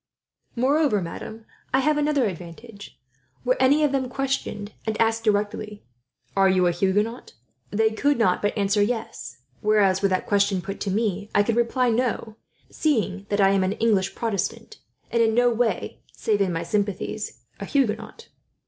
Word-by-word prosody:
"Moreover, 265 -2 +2
madam, 220 +5 -7 0.3
I 265 - +4
have 305 +3 +2
another 295 -3 +2
advantage. 200 +3 -8 0.5
Were 255 +1 +3
any 280 +4 +4
of 295 - +3
them 265 -2 -1
questioned, 260 -6 -3 0.2
and 215 -1 -2
asked 225 0 +2
directly, 210 0 -1 0.5
'Are 195 -1 +4
you 185 -1 +3
a 175 - +3
Huguenot?' 205 +7 -1 0.4
they 220 +1 +2
could 285 +6 +1
not 185 -6 +2
but 205 +2 -1
answer 200 0 +2
yes; 225 +2 -3 0.2
whereas, 205 -3 +3
were 200 - +4
that 185 -1 0
question 200 -1 +2
put 195 +3 -6
to 200 - -3
me 205 0 -1
I 205 - +5
could 230 +2 0
reply 240 +1 +2
'no,' 230 -2 -1 0.4
seeing 205 -10 -1
that 205 - 0
I 195 0 +5
am 195 -1 +2
an 185 +1 0
English 210 -4 +1
Protestant, 225 - -3 0.3
and 235 - +2
in 225 -1 +3
no 245 0 +4
way, 235 0 -1
save 210 -2 0
in 190 -2 +2
my 165 -1 -2
sympathies, 205 - -3 0.2
a 200 - -5
Huguenot." 235 - -2
215 Hz, 165 wpm, -24 LUFS, 200-240 Hz, 0.5 s, I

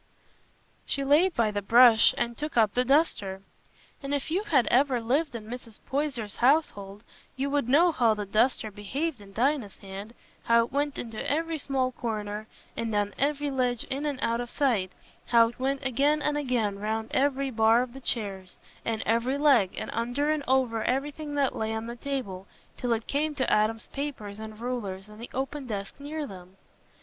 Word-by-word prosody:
She 275 - -1
laid 315 +6 +4
by 225 -2 +2
the 205 0 -2
brush 230 +2 +6
and 235 0 -1
took 300 -1 -5
up 215 -3 +4
the 250 - +2
duster; 235 - +1 0.6
and 280 0 -1
if 285 +2 -3
you 370 +4 +1
had 275 - +3
ever 260 0 +3
lived 265 +4 0
in 220 -2 -6
Mrs. 235 -2 -8
Poyser's 265 -7 -2
household, 210 -7 +1 0.3
you 275 +2 -2
would 285 -4 0
know 335 +6 +5
how 235 -7 +3
the 210 -1 -4
duster 215 +2 +1
behaved 250 +7 -3
in 200 -1 -13
Dinah's 245 -1 0
hand—how 210 +4 -2
it - - -15
went 285 +1 -1
into 225 -2 -5
every 325 +1 -1
small 265 -2 0
corner, 215 -3 -4 0.3
and 225 -2 -2
on 205 0 0
every 290 +1 0
ledge 250 -3 0
in 280 +3 -1
and 285 -2 -2
out 230 +1 +1
of 240 - -6
sight—how 230 -1 +1
it 240 - -14
went 270 +1 -1
again 280 +4 +2
and 295 - +1
again 240 -8 0
round 220 +2 -3
every 275 0 +1
bar 225 +1 +4
of 245 -1 -8
the 270 - -10
chairs, 195 -7 -2 0.3
and 225 -1 -2
every 235 +5 +1
leg, 270 -10 +4
and - - -4
under 245 +6 0
and 305 -2 -1
over 250 -4 +2
everything 290 +3 -2
that 280 -2 +1
lay 220 0 -2
on 220 0 -4
the 235 +1 -6
table, 235 -8 -4 0.3
till 245 - -2
it 225 0 -2
came 300 +2 -1
to 260 - 0
Adam's 215 +1 +1
papers 245 -8 -5
and 220 0 -8
rulers 210 -6 -4
and 210 +1 -13
the 235 - -7
open 270 +1 -4
desk 200 0 -5
near 295 +2 -4
them. 185 -4 -12
245 Hz, 185 wpm, -27 LUFS, 215-280 Hz, 0.6 s, brush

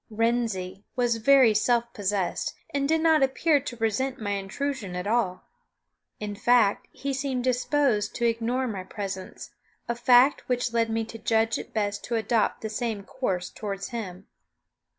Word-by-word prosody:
"Wrensie" 215 -4 -1
was 240 -2 +1
very 255 0 +6
self 235 +2 +1
possessed, 200 -2 -1 0.2
and 280 0 0
did 320 0 +3
not 320 -2 +4
appear 285 +3 +3
to 255 -3 -7
resent 235 +4 -1
my 205 -2 -3
intrusion 200 +1 -3
at 180 +1 -3
all. 205 -4 0 0.8
In 210 -1 -4
fact, 225 -1 +3
he 275 0 -4
seemed 265 -2 -2
disposed 255 -3 +1
to 240 - 0
ignore 235 +3 0
my 200 -5 -4
presence, 190 -1 -6 0.4
a 235 - 0
fact 245 +3 +5
which 245 -1 0
led 230 -1 +2
me 225 0 -1
to 225 0 -9
judge 225 0 +1
it - - -9
best 205 -2 -2
to 235 - -2
adopt 225 -1 +1
the 220 - -3
same 220 -2 -3
course 190 -6 -3
toward 200 -2 -5
him. 200 -7 -6
230 Hz, 160 wpm, -26 LUFS, 205-255 Hz, 0.8 s, very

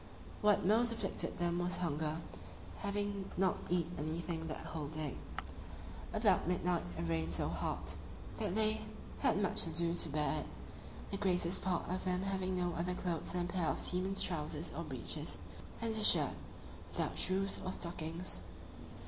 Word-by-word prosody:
What 210 -2 +5
most 230 +4 +5
afflicted 230 - -2
them 175 0 +1
was 175 +1 +1
hunger, 155 -2 0 0.6
having 200 -1 -1
not 190 0 +3
eat 175 -1 +3
anything 160 +1 -2
that 155 - -4
whole 155 -2 -3
day. 155 -2 -3 1.0
About - - +3
midnight 180 -1 +2 0.2
it - - -1
rained 80 0 0
so - - +1
hard, - - -2 0.5
that 205 -4 0
they 215 0 +3 0.4
had - - +3
much - - +2
ado 170 0 +1
to 170 -1 +1
bear 150 -1 +1
it, - - -5 0.6
the 195 - -1
greatest 180 -3 +2
part 185 -2 0
of 185 +1 -1
them 185 0 +1
having 190 -1 0
no 175 -1 +1
other 180 +2 -1
clothes 175 -3 -1
than 180 -1 +1
a 175 - -5
pair 175 -4 +1
of - - +1
seaman's 190 +2 +2
trousers 155 -4 -1
or - - -2
breeches, - - -3 0.5
and 230 - +1
a 220 -1 +4
shirt, - - +7 0.6
without - - -1
shoes 195 +1 +2
or 185 - -1
stockings. 170 0 -3
180 Hz, 160 wpm, -36 LUFS, 165-190 Hz, 1.0 s, shirt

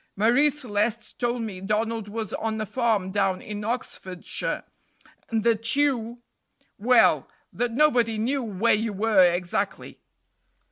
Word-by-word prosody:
Marie 240 +9 +4
Celeste 235 -6 -2
told 240 -1 -1
me 195 -4 -6
Donald 215 +2 -1
was 215 0 -5
on 220 -1 -2
a 215 - -2
farm 215 -4 0
down 195 -2 +1
in 210 +1 -6
Oxfordshire, 205 -6 -4 0.7
and 225 -2 0
that 225 0 +2
you 245 -5 0 0.6
well, 250 +4 +4 0.3
that 240 -1 -1
nobody 245 -5 +3
knew 260 +6 0
where 220 0 +1
you 215 0 0
were 210 0 +3
exactly." 175 0 -1
225 Hz, 130 wpm, -25 LUFS, 205-240 Hz, 0.7 s, Marie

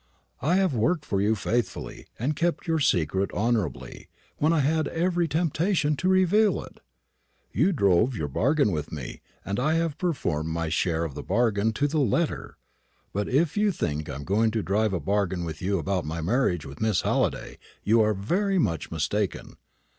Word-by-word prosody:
"I 155 +8 +2
have 190 -5 +2
worked 150 +7 +1
for 100 -1 0
you 105 +2 +2
faithfully, 120 +3 -3
and 140 +6 -1
kept 170 +4 -1
your 165 -2 +1
secret 95 - +1
honourably, 110 -6 -2 0.3
when 155 +2 +3
I 165 -3 +3
had 155 +3 +1
every 175 0 0
temptation 160 0 +1
to 185 - 0
reveal 190 +2 +3
it. - - -14 0.7
You 155 - +2
drove 110 - +2
your 75 -8 -2
bargain 135 - +2
with 75 -4 -3
me, 70 -6 -7 0.2
and 100 +4 -2
I 155 +5 +2
have 165 -2 -1
performed 90 - -1
my 80 0 -2
share 85 0 0
of 80 -4 -4
the - - -6
bargain 110 0 +1
to 145 +7 +1
the 155 +2 0
letter. 150 +5 -1 0.6
But 105 +1 -2
if 145 +4 +2
you 210 0 +2
think 75 - -3
I - - -4
am 70 - -6
going 110 +7 +2
to 110 -1 -2
drive 105 +2 +1
a 90 - -1
bargain 95 +1 -1
with 80 -1 -6
you 100 +2 0
about 95 -3 -1
my 80 +2 -4
marriage 90 - 0
with 70 +1 -10
Miss 110 -4 +2
Halliday, - - -1 0.2
you 115 +2 +4
are 110 -1 +2
very 190 - 0
much 85 - 0
mistaken. 90 +6 -2
110 Hz, 185 wpm, -26 LUFS, -, 0.7 s, you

